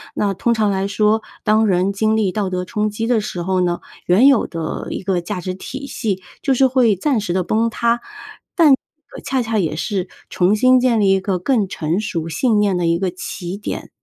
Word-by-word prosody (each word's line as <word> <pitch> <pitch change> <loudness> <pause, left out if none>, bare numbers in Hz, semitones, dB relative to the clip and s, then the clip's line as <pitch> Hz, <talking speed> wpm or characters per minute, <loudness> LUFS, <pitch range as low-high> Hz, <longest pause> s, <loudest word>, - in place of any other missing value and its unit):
那 200 -1 0
通 235 +4 +1
常 215 -2 +1
来 195 0 -1
说， 215 +2 +1 0.2
当 215 +1 +3
人 185 +1 +2
经 220 +2 +1
历 205 -4 +1
道 205 -1 -2
德 180 0 -2
冲 210 +1 -1
击 225 +2 -3
的 240 -3 +2
时 180 -4 -5
候 185 0 0
呢， 175 -1 0 0.3
原 205 +10 +5
有 275 -5 +4
的 165 -2 -5
一 - - -4
个 185 -2 0
价 180 +1 -5
值 185 +1 -4
体 270 +8 -7
系 205 -7 -3 0.2
就 275 - +2
是 265 +1 +4
会 245 -5 +3
暂 250 +4 0
时 175 -4 -2
地 185 - +1
崩 225 +5 +1
塌， 235 0 0 0.5
但 330 -5 +5
呃， 310 +3 -3
恰 260 -1 0
恰 225 -1 -1
也 155 -4 -1
是 185 +2 -2 0.2
重 185 +4 +2
新 255 +3 +5
建 245 -3 +2
立 195 - +3
一 195 - +3
个 190 -2 -1
更 215 -1 +1
成 165 +1 -2
熟 165 -6 -3
信 215 - +1
念 200 -3 +2
的 175 - 0
一 170 +1 +1
个 190 -2 0
起 180 +1 -6
点。 205 - -6
205 Hz, 240 characters per minute, -19 LUFS, 185-230 Hz, 0.5 s, 原